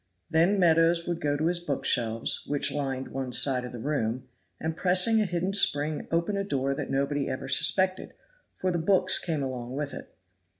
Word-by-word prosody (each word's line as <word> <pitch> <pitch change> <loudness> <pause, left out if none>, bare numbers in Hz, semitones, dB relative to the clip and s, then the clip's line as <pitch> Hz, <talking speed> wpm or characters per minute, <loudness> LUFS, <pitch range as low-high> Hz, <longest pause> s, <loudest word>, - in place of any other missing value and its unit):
Then 170 +5 +3
Meadows 170 -1 +3
would 170 -1 -3
go 145 -2 0
to 155 - -2
his 175 +1 +1
book 150 -5 -4
shelves, 115 -2 +1
which 145 -1 +1
lined 135 -2 -3
one 130 -1 -5
side 130 0 +4
of 125 - -7
the 120 - -8
room, 125 -1 -3 0.3
and 160 0 -3
pressing 185 +6 +3
a - - +1
hidden 180 +2 -2
spring 150 -6 +2
open 170 +5 -1
a 200 - -1
door 140 -7 -1
that - - -5
nobody 140 +1 -1
ever 130 - -5
suspected, 185 +8 +1 0.4
for 185 - -2
the 175 - -1
books 185 +2 +3
came 160 -5 -3
along 125 -1 -5
with 145 0 -4
it. - - -10
150 Hz, 195 wpm, -27 LUFS, 135-175 Hz, 0.4 s, side